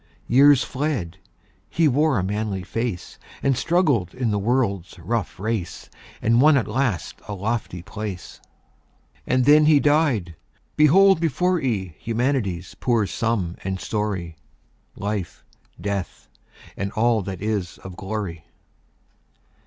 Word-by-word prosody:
Years 140 +2 +6
fled; 125 - -3 0.5
he 165 -2 +2
wore 145 0 +2
a 95 - 0
manly 100 -1 -2
face, 115 -1 -4 0.2
And 135 -1 +3
struggled 140 - +1
in 125 -3 -1
the 105 - 0
world's 100 -6 -1
rough 100 +3 -3
race, 105 -4 -4 0.3
And 115 +2 +4
won 150 0 +6
at 120 - 0
last 115 -4 -2
a 105 - -4
lofty 100 -3 -3
place. 100 -2 -7 0.9
And 130 -1 +2
then 150 +2 +6
he 155 -2 +6
died! 140 - +1 0.4
Behold 185 +5 +6
before 175 +4 +1
ye 100 -10 -2
Humanity's 115 -7 -1
poor 115 -4 +2
sum 100 -5 -2
and 95 0 -3
story; 95 -7 -3 0.6
Life, 100 -2 -4 0.4
Death, 100 -2 -4 0.5
and 100 0 -3
all 115 0 +2
that 95 -1 -6
is 105 -4 -2
of 95 -1 -8
glory. 95 -5 -5
110 Hz, 125 wpm, -23 LUFS, 95-135 Hz, 0.9 s, Years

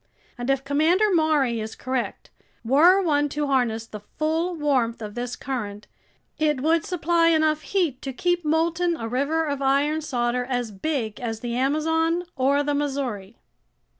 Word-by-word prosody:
And 245 +1 -5
if 270 0 +1
Commander 330 +9 +2
Maury 300 -8 +2
is 220 0 -5
correct, 255 -1 -4 0.3
were 320 +10 +6
one 295 -3 +1
to 295 +1 -2
harness 245 -5 0
the 215 -1 -9
full 320 - -2
warmth 265 -7 0
of 210 -2 -7
this 245 +1 -4
current, 210 -6 -5 0.5
it 300 -4 +1
would 320 +2 +2
supply 340 -1 +1
enough 315 -2 +3
heat 320 -6 -1
to 270 - -4
keep 350 +6 0
molten 330 +2 +1
a 225 - -4
river 285 +7 0
of 285 -2 -3
iron 285 +3 +2
solder 250 -4 -1
as 245 -3 -2
big 220 0 -3
as 225 -2 -4
the 235 -1 -3
Amazon 320 +6 +1
or 280 +2 +2
the 290 0 -1
Missouri." 265 -8 -3
285 Hz, 160 wpm, -24 LUFS, 245-315 Hz, 0.5 s, were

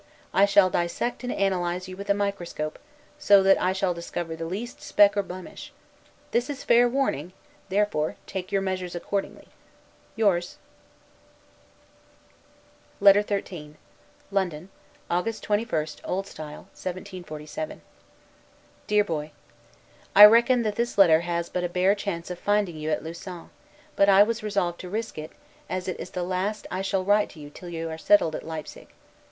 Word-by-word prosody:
I 195 - +6
shall 200 -2 +4
dissect 175 +9 -2
and 245 - -2
analyze 180 -2 -1
you 185 - -8
with 200 +1 -9
a 200 - +4
microscope; 190 -6 -3 0.4
so 200 -6 +6
that 195 0 +5
I 185 - +2
shall 190 -1 0
discover 170 -1 -5
the 165 0 -5
least 215 +8 -6
speck 205 0 +4
or 200 - +2
blemish. 185 -1 -9 0.6
This 240 +3 0
is 280 -1 -5
fair 240 +1 +5
warning; 185 - -1 0.4
therefore 195 -6 0
take 185 -1 -6
your 195 -1 +1
measures 185 -2 -3
accordingly. 195 +3 -4 0.7
Yours. 190 -5 +1 2.4
LETTER 200 0 +7
XIII 180 -7 -5 0.6
LONDON, 185 -3 -2 0.4
August 195 +6 -2
21, 210 -5 0 0.2
O. 190 - -1
S. 195 - -14
1747. 155 -1 -7 1.1
DEAR 210 -1 +4
BOY: 155 -4 -4 0.8
I 205 +1 +12
reckon 235 +3 +5
that 210 -2 -2
this 235 -1 -1
letter 170 -5 +7
has 170 0 -2
but 180 - -3
a 175 - -1
bare 185 +3 +3
chance 180 -4 -4
of 180 - -6
finding 205 -4 +1
you 155 0 -4
at 155 - -1
Lausanne; 170 +2 -8 0.4
but 200 - +4
I 195 +1 +8
was 225 +1 -2
resolved 200 -5 -1
to 180 - -7
risk 220 -4 -4
it, 155 +1 -7 0.4
as 185 0 -3
it 185 - -4
is - - -6
the 180 - -4
last 185 +4 -2
that - - -9
I 185 - -1
shall 195 -1 -1
write 205 +1 +3
to 160 - -14
you 145 -1 -10
till 175 +3 -10
you 165 -1 -4
are 160 - -6
settled 185 -4 +4
at - - -4
Leipsig. 160 -1 -8
185 Hz, 160 wpm, -26 LUFS, 170-205 Hz, 2.4 s, I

